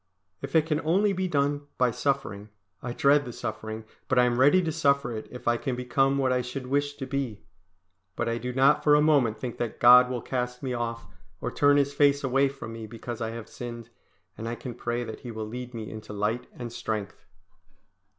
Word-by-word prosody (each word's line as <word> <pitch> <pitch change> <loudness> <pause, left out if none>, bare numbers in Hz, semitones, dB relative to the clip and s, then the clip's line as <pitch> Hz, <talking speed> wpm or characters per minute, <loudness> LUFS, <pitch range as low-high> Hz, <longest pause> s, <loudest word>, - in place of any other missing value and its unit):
If - - -6
it 160 -1 +5
can 155 -1 0
only 195 +6 +2
be 185 0 -1
done 145 -2 0
by 125 -1 +3
suffering, 125 -5 -2 0.3
I 120 - -4
dread 140 +4 +4
the 125 - -7
suffering, 110 -1 -5 0.2
but 130 - +1
I 125 - +7
am 120 0 +1
ready 145 +8 +6
to 160 - -1
suffer 140 -6 +1
if 115 +3 -8
I 120 0 +3
can 130 0 -3
become 135 +2 +1
what 130 -2 +2
I 125 - +1
should 125 +2 -6
wish 145 +2 0
to 135 - -5
be. 130 -5 -3 0.7
But - - -2
I 115 0 -1
do 125 +2 -4
not 135 +2 +4
for 150 -1 +6
a - - +5
moment 140 -8 +3
think 120 +1 -5
that 120 -2 -3
God 125 +1 +8
will 125 -2 -3
cast 125 0 -3
me 130 -2 -2
off 115 -1 -3 0.3
or - - -3
turn 145 0 +4
His 140 0 +2
face 140 0 +3
away 135 +1 +3
from 135 -4 -8
me 115 -1 -7
because 120 +1 -7
I 110 - -1
have 115 -1 -7
sinned; 120 -1 -8 0.5
and 115 +1 -5
I 120 - -3
can 125 0 -7
pray 120 +1 -3
that 110 -2 -7
He 125 - -8
will 110 -1 -5
lead 125 +2 -7
me 110 -2 -6
into 110 -1 -8
light 105 +4 -1
and 120 -2 -7
strength. 105 -3 -5
125 Hz, 220 wpm, -27 LUFS, 115-140 Hz, 0.7 s, God